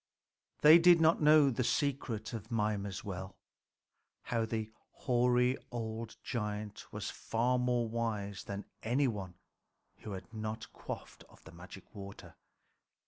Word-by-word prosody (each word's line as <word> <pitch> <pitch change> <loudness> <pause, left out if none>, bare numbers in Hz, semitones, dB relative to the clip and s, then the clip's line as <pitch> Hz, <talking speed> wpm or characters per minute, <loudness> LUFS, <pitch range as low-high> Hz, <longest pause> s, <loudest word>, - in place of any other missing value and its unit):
They 155 +3 +10
did 175 0 +7
not 160 0 +4
know 150 -2 +6
the 125 +1 -1
secret 125 -5 -1
of 110 -1 -6
Mimer's 105 -4 -1
well, 95 -2 -6 0.9
how 115 -2 -1
the 110 -1 -3 0.2
hoary 125 0 +2
old 115 -1 -5
giant 105 -3 -4
was - - -4
far 125 +3 0
more 125 -1 +1
wise 110 -4 -3
than 100 0 -5 0.2
any 130 +5 +2
one 95 -6 -4 0.6
who 105 - -7
had 95 +4 -9
not 110 0 -5
quaffed - - -8
of - - -20
the 80 - -12
magic 90 +2 -12
water. 100 -2 -10
115 Hz, 135 wpm, -33 LUFS, 105-125 Hz, 0.9 s, They